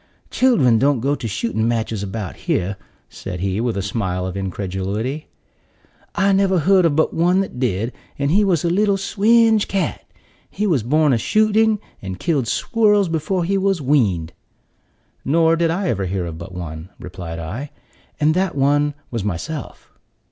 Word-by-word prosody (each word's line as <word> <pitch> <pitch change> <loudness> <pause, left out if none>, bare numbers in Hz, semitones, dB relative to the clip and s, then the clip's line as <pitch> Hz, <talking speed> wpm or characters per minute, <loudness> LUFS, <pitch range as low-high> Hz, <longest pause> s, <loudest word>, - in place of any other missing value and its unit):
"Children 140 - +3
don't 140 0 +2
go 140 +5 0
to 120 - -4
shooting 110 - -1
matches 115 -3 -1
about 100 -1 -5
here," 95 +3 0 0.3
said 90 -2 -7
he, 95 +2 -1
with 120 -3 -1
a 100 - -2
smile 95 -3 -2
of 95 0 -5
incredulity. 100 - -3 0.9
"I 200 0 +3
never 195 -1 +3
heard 185 +3 +4
of 145 - -1
but 160 - +2
one 175 +3 +2
that 190 -10 -6
did, 115 -1 -1 0.2
and 140 +1 0
he 205 +5 +4
was 175 -5 +1
a - - +2
little 200 +2 +2
swinge 220 +2 +3
cat. 195 -1 -2 0.5
He 210 - -2
was 165 - +2
born 150 +5 +2
a 115 - +1
shooting, 215 - +3 0.2
and 95 -2 -6
killed 140 -8 0
squirrels 210 - +2
before 165 +3 -1
he 195 +3 0
was 195 -2 +1
weaned." 105 - +1 0.9
"Nor 165 +3 +3
did 165 0 +1
I 185 +3 -1
ever 100 -4 -1
hear 90 -1 -2
of 80 -1 -7
but 85 +3 -8
one," 85 -1 -7
replied 90 -2 -7
I, 105 - -5 0.5
"and 155 +1 +3
that 185 -1 0
one 145 +1 +2 0.2
was 115 -5 -3
myself." 110 - -5
140 Hz, 170 wpm, -20 LUFS, -, 0.9 s, heard